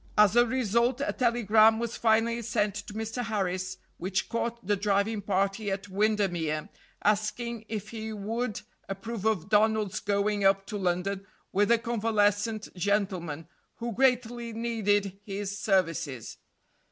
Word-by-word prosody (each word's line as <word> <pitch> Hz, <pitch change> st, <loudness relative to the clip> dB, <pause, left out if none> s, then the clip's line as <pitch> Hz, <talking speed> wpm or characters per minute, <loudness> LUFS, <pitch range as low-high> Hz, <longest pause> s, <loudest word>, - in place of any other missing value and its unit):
As 210 Hz, 0 st, +6 dB
a 240 Hz, 0 st, +6 dB
result, 240 Hz, +1 st, +1 dB
a -, -, -1 dB
telegram 225 Hz, -2 st, +4 dB
was 235 Hz, 0 st, -3 dB
finally 230 Hz, +1 st, +2 dB
sent 210 Hz, -2 st, 0 dB
to 205 Hz, -, -7 dB
Mr. 225 Hz, +3 st, -3 dB
Harris, 185 Hz, -3 st, -2 dB, 0.2 s
which 190 Hz, +2 st, -2 dB
caught 235 Hz, -1 st, -3 dB
the 205 Hz, +2 st, +2 dB
driving 205 Hz, +2 st, +1 dB
party 200 Hz, +2 st, 0 dB
at 195 Hz, +1 st, -3 dB
Windemere, 190 Hz, -5 st, 0 dB, 0.3 s
asking 220 Hz, +2 st, 0 dB
if 215 Hz, -3 st, -4 dB
he 220 Hz, -1 st, -5 dB
would 220 Hz, +2 st, -3 dB, 0.3 s
approve 200 Hz, +2 st, -5 dB
of 210 Hz, -5 st, +1 dB
Donald's 215 Hz, -1 st, +2 dB
going 205 Hz, 0 st, 0 dB
up 195 Hz, 0 st, +4 dB
to 210 Hz, 0 st, -4 dB
London 190 Hz, +2 st, -1 dB, 0.2 s
with 205 Hz, +1 st, +2 dB
a 235 Hz, -, +6 dB
convalescent 215 Hz, -1 st, +1 dB
gentleman 180 Hz, -5 st, -1 dB, 0.3 s
who 235 Hz, 0 st, -4 dB
greatly 240 Hz, -1 st, +1 dB
needed 205 Hz, -4 st, 0 dB
his 200 Hz, 0 st, -4 dB
services. 165 Hz, -, -1 dB
210 Hz, 135 wpm, -28 LUFS, 195-225 Hz, 0.3 s, As